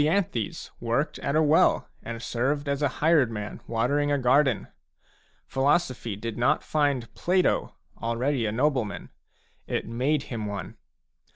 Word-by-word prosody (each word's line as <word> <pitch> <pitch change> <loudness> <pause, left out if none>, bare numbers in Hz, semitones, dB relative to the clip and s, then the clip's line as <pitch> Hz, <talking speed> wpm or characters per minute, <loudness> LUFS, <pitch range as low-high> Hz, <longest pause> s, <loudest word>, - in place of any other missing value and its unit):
worked 120 +5 -1
at 140 - -1
a 155 - +4
well 155 +2 +4
and 115 0 -6
served 140 +5 -1
as 140 0 -1
a 145 - +4 0.2
hired 155 -7 +5
man 105 -2 -6
watering 140 +6 +1
a 145 - +3
garden. 130 -1 +3 0.8
Philosophy 135 -5 0
did 115 +3 -5
not 120 - +2
find 145 -6 0
Plato 180 +1 +1 0.3
already 115 +1 0
a - - -1
nobleman; 125 -3 -1 0.6
it - - -2
made 130 +6 0
him 110 -4 -4
one. 100 -1 -5
130 Hz, 130 wpm, -26 LUFS, 115-145 Hz, 0.8 s, hired